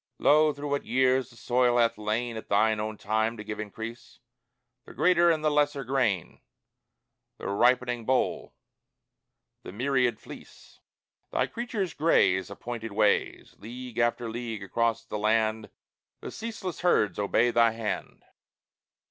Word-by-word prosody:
Lo, 155 Hz, +1 st, +4 dB
through 145 Hz, 0 st, -7 dB
what 145 Hz, -, 0 dB
years 130 Hz, 0 st, +2 dB
the 120 Hz, -, -18 dB
soil 120 Hz, 0 st, +1 dB
hath 115 Hz, -1 st, +3 dB
lain 110 Hz, +3 st, -2 dB
At 110 Hz, -, -8 dB
thine 110 Hz, +1 st, +2 dB
own 110 Hz, 0 st, -4 dB
time 110 Hz, +3 st, -1 dB
to 105 Hz, -, -7 dB
give 105 Hz, 0 st, -6 dB
increase 115 Hz, +3 st, -8 dB, 0.7 s
The -, -, -12 dB
greater 175 Hz, -1 st, +4 dB
and 155 Hz, -2 st, +1 dB
the 155 Hz, -, +3 dB
lesser 145 Hz, -1 st, +1 dB
grain, 125 Hz, -, -1 dB, 1.0 s
The -, -, -10 dB
ripening 120 Hz, +3 st, +2 dB
boll, 130 Hz, +3 st, -1 dB, 1.1 s
the -, -, -9 dB
myriad 125 Hz, +3 st, 0 dB
fleece! -, -, -14 dB, 0.5 s
Thy -, -, 0 dB
creatures 225 Hz, -6 st, -4 dB
graze 95 Hz, -, +2 dB
Appointed 115 Hz, +2 st, -6 dB
ways; 105 Hz, 0 st, +1 dB
League 120 Hz, +1 st, -8 dB
after 120 Hz, 0 st, +1 dB
league 115 Hz, -2 st, -5 dB
across 115 Hz, +4 st, -1 dB
the 105 Hz, -, -5 dB
land 110 Hz, 0 st, +1 dB, 0.5 s
The -, -, -7 dB
ceaseless 220 Hz, -6 st, -6 dB
herds 140 Hz, -, +2 dB
obey 115 Hz, +4 st, +2 dB
thy 115 Hz, -1 st, +4 dB
hand. 115 Hz, -1 st, -5 dB
120 Hz, 140 wpm, -27 LUFS, 110-130 Hz, 1.1 s, Lo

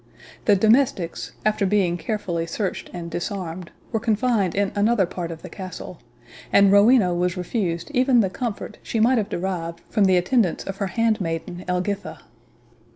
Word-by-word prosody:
The 205 Hz, -, +5 dB
domestics, 215 Hz, -4 st, +2 dB
after 215 Hz, -1 st, +2 dB
being 190 Hz, -3 st, +2 dB
carefully 175 Hz, -3 st, -3 dB
searched 190 Hz, +3 st, -3 dB
and 170 Hz, -2 st, -7 dB
disarmed, 180 Hz, -2 st, -4 dB, 0.2 s
were 225 Hz, -, 0 dB
confined 220 Hz, -4 st, +1 dB
in 200 Hz, 0 st, +1 dB
another 205 Hz, 0 st, +3 dB
part 175 Hz, -1 st, -5 dB
of 165 Hz, -1 st, -8 dB
the -, -, -7 dB
castle; 185 Hz, -3 st, -8 dB, 0.5 s
and 200 Hz, -1 st, +6 dB
Rowena 205 Hz, -2 st, +5 dB
was 180 Hz, +1 st, 0 dB
refused 180 Hz, -, -2 dB
even 255 Hz, -2 st, +4 dB
the 195 Hz, -, 0 dB
comfort 230 Hz, -1 st, -5 dB
she 225 Hz, -, -3 dB
might 240 Hz, +2 st, +4 dB
have 210 Hz, -1 st, -2 dB
derived 170 Hz, -2 st, -4 dB
from 210 Hz, -3 st, +3 dB
the 185 Hz, -1 st, +4 dB
attendance 185 Hz, 0 st, +1 dB
of 195 Hz, 0 st, -6 dB
her 200 Hz, -, -1 dB
handmaiden 185 Hz, -5 st, -1 dB
Elgitha. 185 Hz, +3 st, -2 dB
195 Hz, 160 wpm, -23 LUFS, 175-220 Hz, 0.5 s, and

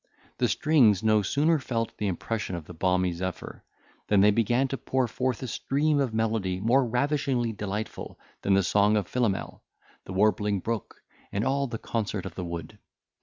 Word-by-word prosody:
The 125 Hz, -, +3 dB
strings 115 Hz, -, +3 dB
no 110 Hz, -1 st, +4 dB
sooner 150 Hz, -, +2 dB
felt 115 Hz, -4 st, -3 dB
the 105 Hz, -, 0 dB
impression 95 Hz, +1 st, -3 dB
of 85 Hz, -3 st, -7 dB
the 90 Hz, -, -10 dB
balmy 90 Hz, +1 st, +1 dB
zephyr, 95 Hz, +1 st, -6 dB, 0.4 s
than 100 Hz, -2 st, +4 dB
they 105 Hz, +1 st, +6 dB
began 120 Hz, +5 st, +2 dB
to 135 Hz, -, -3 dB
pour 130 Hz, -2 st, 0 dB
forth 125 Hz, +1 st, -2 dB
a -, -, -3 dB
stream 145 Hz, +5 st, 0 dB
of 135 Hz, -4 st, +1 dB
melody 110 Hz, -4 st, -1 dB
more 120 Hz, +7 st, +3 dB
ravishingly 125 Hz, -1 st, 0 dB
delightful 105 Hz, +1 st, -5 dB, 0.2 s
than 100 Hz, -, +3 dB
the 100 Hz, -, +3 dB
song 105 Hz, +3 st, +3 dB
of 100 Hz, -4 st, -1 dB
Philomel, 115 Hz, -7 st, -1 dB, 0.4 s
the 95 Hz, -, -7 dB
warbling 105 Hz, 0 st, +2 dB
brook, 115 Hz, +2 st, -5 dB, 0.3 s
and 100 Hz, +4 st, -1 dB
all 140 Hz, +1 st, +1 dB
the 115 Hz, -2 st, -4 dB
concert 105 Hz, -4 st, -3 dB
of 95 Hz, -, -6 dB
the 90 Hz, -, -5 dB
wood. 85 Hz, -1 st, -6 dB
110 Hz, 175 wpm, -27 LUFS, 95-125 Hz, 0.4 s, they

